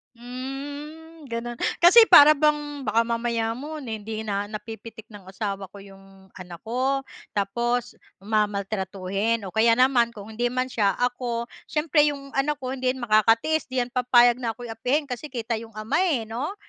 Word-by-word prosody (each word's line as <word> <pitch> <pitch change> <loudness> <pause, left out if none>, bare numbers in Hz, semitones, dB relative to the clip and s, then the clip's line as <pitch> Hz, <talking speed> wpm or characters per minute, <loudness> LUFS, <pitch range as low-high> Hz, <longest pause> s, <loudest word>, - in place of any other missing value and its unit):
Hmm, 285 +6 -8
gano'n. 235 0 -5 0.2
Kasi 445 +6 +8
para 290 +1 +9
bang 295 -2 0
baka 225 +2 +3
mamaya 230 -1 -1
mo 300 +3 -7
na 235 - -6
hindi 215 +1 -6
na 205 -1 -2
napipitik 220 +1 -9
ng 200 -3 -13
asawa 195 0 -4
ko 200 - -15
'yong 195 -1 -17
anak 175 -2 -10
ko, 260 +4 -1 0.3
tapos 235 +4 -1 0.3
mamaltratuhin. 200 0 -1
O 190 - -7
kaya 230 +1 +4
naman 245 -2 +3
kung 210 +1 -10
hindi 240 +2 -1
man 255 +1 -2
siya 200 -5 +1
ako, 245 -1 -2 0.2
siyempre 300 -1 +2
'yong 275 -2 -5
anak 290 +2 0
ko 255 - -4
hindi 255 -1 -1
yan 255 - -8
makakatiis, 225 +8 +3
'di 255 -1 -1
'yan 245 - -11
papayag 245 -1 +4
na 230 -3 -2
ako'y 240 -1 -8
apihin, 265 +6 -1
kasi 250 +4 -5
kita 235 -4 -3
'yong 225 -1 -12
ama 215 +9 -1
eh 270 -10 0
'no. 245 - -4
235 Hz, 170 wpm, -24 LUFS, 215-270 Hz, 0.3 s, para